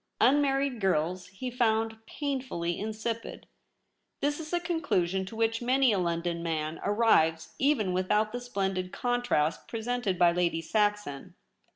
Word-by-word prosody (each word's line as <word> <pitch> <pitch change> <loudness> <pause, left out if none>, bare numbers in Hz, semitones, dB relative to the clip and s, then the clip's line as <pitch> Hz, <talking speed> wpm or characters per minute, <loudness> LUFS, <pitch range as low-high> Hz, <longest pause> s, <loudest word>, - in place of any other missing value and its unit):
Unmarried 275 -3 +3
girls 180 0 0
he 245 +6 -6
found 225 -2 0
painfully 255 - -3
insipid. 220 +2 -4 0.7
This 290 +2 0
is 315 -1 -7
a 350 - +1
conclusion 190 - 0
to 220 - -8
which 225 +1 0
many 255 +1 +3
a 200 - +1
London 170 -1 -1
man 160 -1 -2
arrives 180 -7 +2
even 265 -10 +2
without 210 +4 +1
the 245 +1 -4
splendid 190 -6 -2
contrast 245 -11 0
presented 230 -4 -2
by 175 -1 +5
a - - -3
Lady 170 -2 +1
Saxon. 205 -5 -1
215 Hz, 140 wpm, -29 LUFS, 175-245 Hz, 0.7 s, by